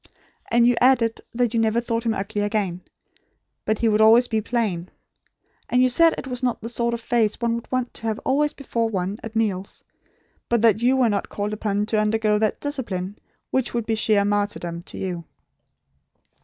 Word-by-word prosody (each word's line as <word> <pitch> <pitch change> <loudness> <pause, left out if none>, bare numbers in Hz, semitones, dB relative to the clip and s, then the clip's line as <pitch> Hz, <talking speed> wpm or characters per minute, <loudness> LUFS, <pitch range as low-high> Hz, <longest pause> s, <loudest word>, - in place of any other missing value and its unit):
And 235 0 +4
you 245 - +4
added 245 -3 +3
that 240 -1 0
you 230 - +2
never 225 +1 +2
thought 230 0 -2
him 220 - +1
ugly 205 +1 -3
again; 205 -4 -1 0.8
but 215 - +1
he 230 - +1
would 215 0 +3
always 230 +3 +6
be 220 -2 0
plain. 205 -7 -2 0.8
And 250 +1 +3
you 255 - +4
said 330 +6 +4
it - - -6
was 250 -2 -3
not 245 -2 0
the 230 - -6
sort 235 0 -1
of - - -5
face 230 -2 +1
one 235 -1 0
would 235 0 -6
want 255 -1 -1
to 225 - -6
have 220 -1 -1
always 290 +3 +2
before 235 -6 -2
one 195 0 -3
at 225 0 -8
meals; 200 -4 -2 0.7
but 235 -2 +1
that 220 -1 +4
you 255 +2 +3
were 255 -2 +4
not 205 -1 -2
called 205 +1 -3
upon 205 -1 -1
to 215 0 0
undergo 215 0 +1
that 215 -1 0
discipline, 210 -10 -4 0.3
which 260 -2 0
would 235 -2 -1
be 225 - -1
sheer 215 -2 +2
martyrdom 205 -5 -1
to - - -8
you." 180 -3 -4
225 Hz, 195 wpm, -23 LUFS, 205-240 Hz, 0.8 s, always